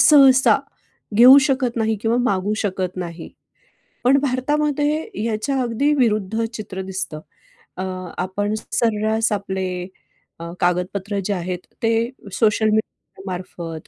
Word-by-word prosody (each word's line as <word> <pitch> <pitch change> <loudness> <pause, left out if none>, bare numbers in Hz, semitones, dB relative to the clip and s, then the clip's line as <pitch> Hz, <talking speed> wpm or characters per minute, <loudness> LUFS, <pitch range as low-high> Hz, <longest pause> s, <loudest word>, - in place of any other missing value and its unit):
सहसा 270 -4 +6 0.6
घेऊ 255 +4 +9
शकत 260 -3 0
नाही 220 -1 +1
किंवा 230 +1 +1
मागू 205 -4 0
शकत 190 -4 -2
नाही. 170 -2 -6 0.7
पण 265 +3 +5
भारतामध्ये 295 - 0 0.2
याच्या 230 +5 -1
अगदी 250 +5 +1
विरुद्ध 220 -4 +1
चित्र 190 -4 -6
दिसतं. 190 -5 -5 0.6
अ, 185 - -3 0.3
आपण 205 +3 -2 0.2
सर्रास 220 0 +1
आपले 190 -2 -3 0.6
अ, 170 - -6
कागदपत्र 185 +3 -1
जे 205 - 0
आहेत 180 -1 -3 0.3
ते 225 - +3 0.4
सोशल 220 +1 +2
मीडिया 215 -2 -3
मार्फत 175 -3 -6
215 Hz, 115 wpm, -21 LUFS, 185-250 Hz, 0.7 s, घेऊ